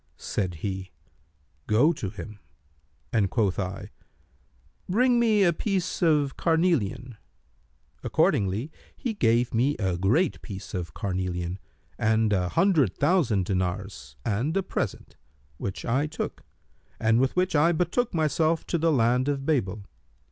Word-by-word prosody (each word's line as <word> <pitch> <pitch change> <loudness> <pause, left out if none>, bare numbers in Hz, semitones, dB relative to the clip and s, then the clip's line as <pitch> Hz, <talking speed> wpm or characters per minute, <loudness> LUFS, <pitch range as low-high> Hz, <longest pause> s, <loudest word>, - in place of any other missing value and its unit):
Said 95 -4 -3
he, 95 -1 -4 0.8
'Go 125 +10 +4
to 105 - -4
him;' 105 +2 -9 0.7
and 105 -4 +2
quoth 105 -5 0
I, 95 0 -4 1.0
'Bring 240 +5 +3
me 220 -4 +4
a 175 -2 +4
piece 190 +1 -2
of 150 -5 +2
carnelian.' 130 - 0 0.9
Accordingly 105 +9 +1 0.3
he 245 -5 -3
gave 120 - +2
me 130 +6 +2
a 95 -4 -1
great 125 - +1
piece 95 -3 -8
of 85 -4 -4
carnelian 90 -1 -3 0.4
and 110 -1 +2
an 90 -2 +1
hundred 165 - +2
thousand 140 - +2
dinars 90 -8 -3
and 125 - 0
a 195 - +1
present, - - -4 0.4
which 95 +4 -5
I 130 +5 +1
took, 155 - -5 0.6
and 110 +1 +3
with 135 - 0
which 185 -1 +1
I 155 +4 +5
betook 180 +9 0
myself 160 0 +1
to 170 - -1
the 165 +1 +3
land 125 0 +2
of 140 -1 -2
Babel. 105 -10 -1
125 Hz, 135 wpm, -26 LUFS, 100-165 Hz, 1.0 s, I